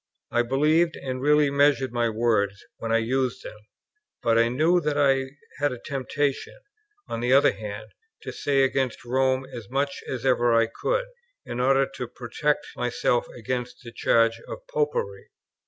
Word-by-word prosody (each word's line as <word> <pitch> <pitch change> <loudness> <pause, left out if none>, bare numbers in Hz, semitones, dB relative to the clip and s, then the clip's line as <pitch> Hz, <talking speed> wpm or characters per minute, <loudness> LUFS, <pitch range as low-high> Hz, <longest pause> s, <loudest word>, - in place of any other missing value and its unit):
I 120 - +3
believed, 155 +7 +2
and 130 -1 -5
really 150 0 +4
measured, 140 -2 +3
my 120 -1 +1
words, 110 -3 0
when 115 - -4
I 115 - +4
used 125 +2 -1
them; 105 - -9 0.6
but 115 -1 +3
I 115 0 +4
knew 160 +8 +2
that 150 -2 -1
I 135 -2 +3 0.3
had 145 0 +1
a 125 - -5
temptation, 140 - -3 0.5
on - - -4
the 120 +2 0
other 140 - +6
hand, 105 +1 -8 0.3
to - - -5
say 135 -1 +1
against 130 -2 -1
Rome 130 +1 +1
as 115 -5 -8
much 140 +2 -1
as 130 -1 -4
ever 120 -2 +3
I 115 0 +5 0.2
could, - - +1 0.4
in 120 - -5
order 135 +2 +3
to 125 - -4
protect 130 +5 -2
myself 125 0 0
against 125 +2 -4
the 120 - -9
charge 115 0 +2
of - - -8
Popery. 475 -1 -2
130 Hz, 165 wpm, -25 LUFS, 120-145 Hz, 0.6 s, other